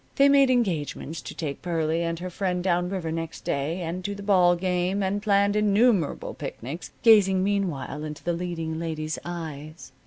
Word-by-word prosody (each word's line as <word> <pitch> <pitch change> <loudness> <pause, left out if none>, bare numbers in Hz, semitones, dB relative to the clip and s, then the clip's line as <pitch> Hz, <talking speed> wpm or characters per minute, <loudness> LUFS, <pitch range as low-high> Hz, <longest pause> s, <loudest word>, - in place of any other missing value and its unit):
They 275 0 +5
made 275 -1 +5
engagements 165 - -1
to - - -8
take 145 -4 -4
Pearlie 165 -2 0
and 165 0 -1
her 180 +2 -6
friend 180 -1 -1
down 180 -1 +1
river 180 -4 -3
next 165 0 -5
day, 155 +6 -2
and 175 +2 -4
to 205 +1 -3
the 200 - -8
ball 180 -3 +4
game, 180 +2 0
and 195 +2 -1
planned 200 -1 +3
innumerable 210 - +2
picnics, 145 +9 -7
gazing 195 -5 +6
meanwhile 175 -8 -2
into 150 -1 -7
the 175 - 0
leading 165 -2 -3
lady's 155 -2 -3
eyes. 155 -3 -7
175 Hz, 175 wpm, -26 LUFS, 160-200 Hz, -, gazing